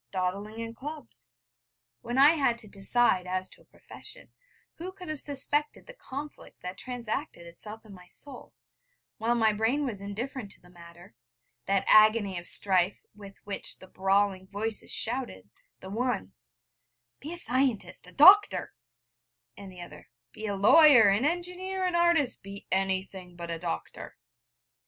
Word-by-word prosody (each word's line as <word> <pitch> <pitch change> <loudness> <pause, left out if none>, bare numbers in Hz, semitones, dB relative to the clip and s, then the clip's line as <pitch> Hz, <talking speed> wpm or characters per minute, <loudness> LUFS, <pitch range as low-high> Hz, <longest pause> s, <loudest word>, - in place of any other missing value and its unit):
dawdling 200 - -4
in 230 0 -6
clubs. 125 - -10 0.7
When 240 +2 -4
I 280 +3 +7
had 275 -7 +1
to 230 -2 -9
decide 195 -1 +1
as 185 0 -3
to - - -15
a - - -24
profession, - - -10 0.5
who 360 +3 -6
could 365 -3 -11
have 310 -2 -4
suspected 290 +1 -1
the - - -12
conflict 290 - -10
that 180 +2 -7
transacted 245 - -5
itself 210 +6 -11
in 210 - -13
my 180 -1 -15
soul, 270 +6 -6 0.6
while 230 +2 +1
my 220 -2 +2
brain 230 +8 0
was 215 -7 -5
indifferent 220 +3 -6
to - - -21
the 175 - -21
matter 170 -3 -15 0.5
that 195 0 +1
agony 215 -3 +5
of 175 - -12
strife 185 -1 +3
with 200 -1 -12
which 200 - -1
the - - -14
brawling 190 0 0
voices 210 +2 -3
shouted, 225 - 0 0.3
the 190 - -9
one: 220 - -2 0.9
'Be 300 - -7
a - - 0
scientist 245 - -1
a - - -12
doctor,' 310 - +6 0.8
and 195 -1 -11
the 180 -1 -12
other: 155 -3 -12 0.2
'Be 220 - -7
a 200 - -2
lawyer, 235 +2 +7
an 205 +7 +1
engineer, 360 +3 -2
an 365 - -1
artist 340 -6 +2
be 195 0 -10
anything 190 -1 0
but 170 -1 -7
a 165 - -4
doctor!' 80 - -6
215 Hz, 155 wpm, -28 LUFS, 185-270 Hz, 0.9 s, I